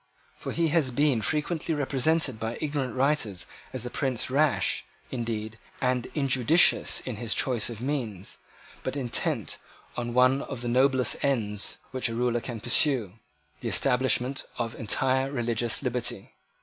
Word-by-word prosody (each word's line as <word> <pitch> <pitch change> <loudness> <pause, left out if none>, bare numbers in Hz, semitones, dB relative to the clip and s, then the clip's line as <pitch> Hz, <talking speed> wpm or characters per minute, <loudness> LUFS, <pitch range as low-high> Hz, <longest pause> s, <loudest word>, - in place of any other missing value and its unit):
For - - -6
he 165 -1 +1
has 155 -4 +2
been 140 -2 +2
frequently 160 +5 0
represented 140 -2 +1
by 115 +1 -3
ignorant 145 -5 -2
writers 130 - 0 0.3
as 125 -2 -4
a 125 - -5
prince 130 -2 -1
rash, 145 +1 +2 0.3
indeed, 110 -3 -4 0.2
and 125 -1 0
injudicious 135 +3 +4
in 125 -5 -5
his 115 0 -1
choice 120 -5 +2
of 115 -2 -7
means, 120 -9 -3 0.4
but 130 - -3
intent 130 -4 -2 0.4
on 120 0 -3
one 130 +2 +4
of 135 -5 -6
the 120 - -3
noblest 130 0 +2
ends 110 -7 0
which 130 -2 0
a 115 - -4
ruler 120 0 +1
can 120 -2 -6
pursue, 120 - +3 0.5
the - - -3
establishment 130 +1 +2
of 115 -2 -2
entire 130 +4 +1
religious 120 -2 -1
liberty. 120 -5 -3
125 Hz, 145 wpm, -27 LUFS, 115-140 Hz, 0.5 s, injudicious